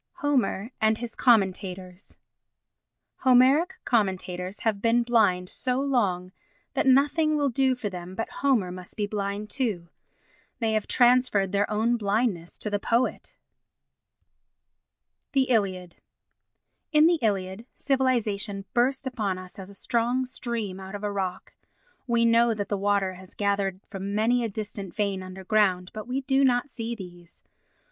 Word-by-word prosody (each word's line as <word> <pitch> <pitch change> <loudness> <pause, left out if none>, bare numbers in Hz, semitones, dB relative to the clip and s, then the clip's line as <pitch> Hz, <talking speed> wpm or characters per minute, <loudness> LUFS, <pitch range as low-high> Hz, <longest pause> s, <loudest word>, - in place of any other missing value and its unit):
Homer 255 -6 0
and 220 0 +3
his 235 -1 -6
Commentators 190 -5 0 1.0
Homeric 265 +8 +4
commentators 185 -3 -1
have 215 -3 0
been 235 +1 +3
blind 210 -7 +2
so 250 +6 -1
long 200 -10 0 0.4
that - - 0
nothing 295 +4 +3
will 285 -2 +1
do 260 +1 +2
for 240 -4 -4
them 180 -1 -7
but 225 - -3
Homer 240 -10 +2
must 180 0 -10
be 210 - 0
blind 205 0 -4
too. 210 -11 -2 0.7
They 225 -2 0
have 215 -1 0
transferred 245 -6 +3
their 200 0 +1
own 225 +3 +1
blindness 200 -5 -1
to 210 - -4
the 205 - 0
poet. 235 +4 -1 2.0
The 270 -1 +4
Iliad 185 -6 0 0.9
In 305 0 +6
the 340 0 +4
Iliad, 200 +1 -1
civilisation 225 -7 0
bursts 260 +3 +1
upon 210 -7 -2
us 185 +2 -10
as 190 0 -8
a 200 - -13
strong 240 +4 0
stream 235 -6 -4
out 190 +1 -8
of 205 - -7
a 205 - -1
rock. 190 -2 -4 0.5
We 235 -1 +2
know 230 0 +4
that 205 -1 -4
the 205 - 0
water 200 -1 +1
has 185 0 -14
gathered 200 -2 0
from 200 0 -4
many 235 +3 +2
a 230 - -1
distant 200 -2 -6
vein 200 -3 -1
underground, 185 0 0
but 215 +1 -7
we 260 +2 -2
do 270 +1 +2
not 255 +1 +2
see 235 0 -4
these. 175 -4 -13
215 Hz, 145 wpm, -26 LUFS, 190-245 Hz, 2.0 s, In